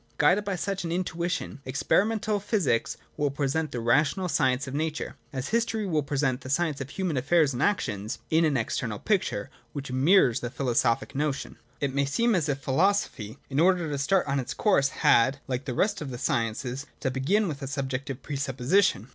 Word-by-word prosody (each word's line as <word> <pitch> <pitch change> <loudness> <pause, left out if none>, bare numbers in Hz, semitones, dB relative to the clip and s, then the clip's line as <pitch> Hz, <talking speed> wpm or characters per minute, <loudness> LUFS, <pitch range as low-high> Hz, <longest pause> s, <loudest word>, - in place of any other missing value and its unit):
Guided 185 +8 +4
by 200 -2 -2
such 195 +1 -3
an 165 - -3
in 180 +2 0
tuition, 170 -4 -3
experimental 205 +11 +1
physics 190 - 0 0.2
will 145 -1 +1
present 145 +3 -1
the 120 - -3
rational 145 +10 +2
science 130 -5 +1
of 130 - -7
Nature, 155 +1 -3
— - - -37
as 130 -1 -4
history 225 -2 0
will 160 -5 +1
present 135 -2 -1
the 130 - -8
science 150 0 0
of 140 - -5
human 175 -2 -2
affairs 145 +2 +3
and 120 - -3
actions 110 - -1
— - - -38
in 160 +1 +4
an 150 -4 +2
external 115 -1 -2
picture, 135 - -1 0.2
which 135 -2 -5
mirrors 135 - +4
the 120 - -4
philosophic 120 -2 0
notion. 145 0 -2 0.3
17.] 140 - +2
It 135 - -7
may 140 0 +1
seem 230 +12 +1
as 165 -6 +1
if 140 - 0
philosophy, 135 - 0
in 140 +1 -1
order 175 0 +3
to 145 - -1
start 185 +6 +2
on 140 0 0
its 130 - -4
course, 140 -10 +3
had, 130 +3 +3
like 130 0 -3
the 125 -3 -3
rest 205 - +1
of 145 - -4
the 125 - -5
sciences, 120 +4 -2
to 130 - -1
begin 185 +11 +1
with 145 -4 -5
a 135 - -4
subjective 135 -1 -4
presupposition. 135 - +1
140 Hz, 200 wpm, -27 LUFS, 130-175 Hz, 0.3 s, Guided